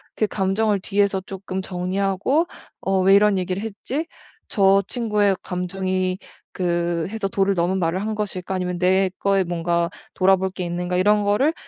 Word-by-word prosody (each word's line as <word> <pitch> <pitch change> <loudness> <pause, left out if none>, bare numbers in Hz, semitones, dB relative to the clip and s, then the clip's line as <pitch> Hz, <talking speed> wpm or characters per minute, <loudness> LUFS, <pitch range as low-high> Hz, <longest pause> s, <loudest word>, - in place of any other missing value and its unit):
그 215 - +1
감정을 205 +1 +1
뒤에서 200 0 +1
쪼끔 190 0 -5
정리하고 195 - 0 0.3
'어 190 0 +1
왜 190 +1 +5
이런 205 -1 +4
얘기를 185 +2 -2
했지? 250 +9 -4 0.4
저 195 -1 +4
친구의 210 -5 +1
감정이 185 0 -2 0.3
그 170 -2 -1
해서 220 -2 -2
도를 195 0 +1
넘은 180 +1 0
말을 175 +2 0
한 215 +1 -2
것일까 190 -3 -3
아니면 180 -1 -2
내 190 +1 +3
거에 195 -1 +2
뭔가 170 -1 0 0.3
돌아볼 190 0 +3
게 185 -1 -5
있는가?' 175 +1 -2
이런 210 +3 +4
거를 210 +10 +2
190 Hz, 315 characters per minute, -22 LUFS, 180-200 Hz, 0.4 s, 왜